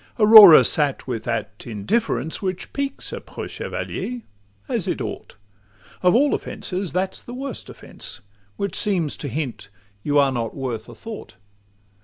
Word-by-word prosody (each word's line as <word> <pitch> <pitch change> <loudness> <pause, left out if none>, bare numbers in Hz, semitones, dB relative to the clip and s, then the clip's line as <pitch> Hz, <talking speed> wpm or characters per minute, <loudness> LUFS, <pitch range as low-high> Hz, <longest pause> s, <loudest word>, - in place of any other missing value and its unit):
Aurora 210 -6 +10
sat 145 -3 +1
with 120 -4 -4
that 105 -3 -4
indifference 120 - -1
Which 185 -2 -4
piques 280 -1 -3
a - - -5
preux - - -8
chevalier—as 100 - -5
it - - -1
ought: - - -6 0.7
Of 180 +2 +4
all 285 +4 +3
offences 185 -1 -4
that 185 +1 -1
's - - -4
the 240 - -9
worst 270 -1 -5
offence, - - -7 0.4
Which 200 -3 -3
seems 175 -8 0
to 145 - -5
hint 130 -7 -5 0.3
you 145 +4 0
are 140 -1 +4
not 115 -3 -3
worth 120 -4 -5
a 120 - -11
thought. 220 - -9
155 Hz, 150 wpm, -22 LUFS, -, 0.7 s, Aurora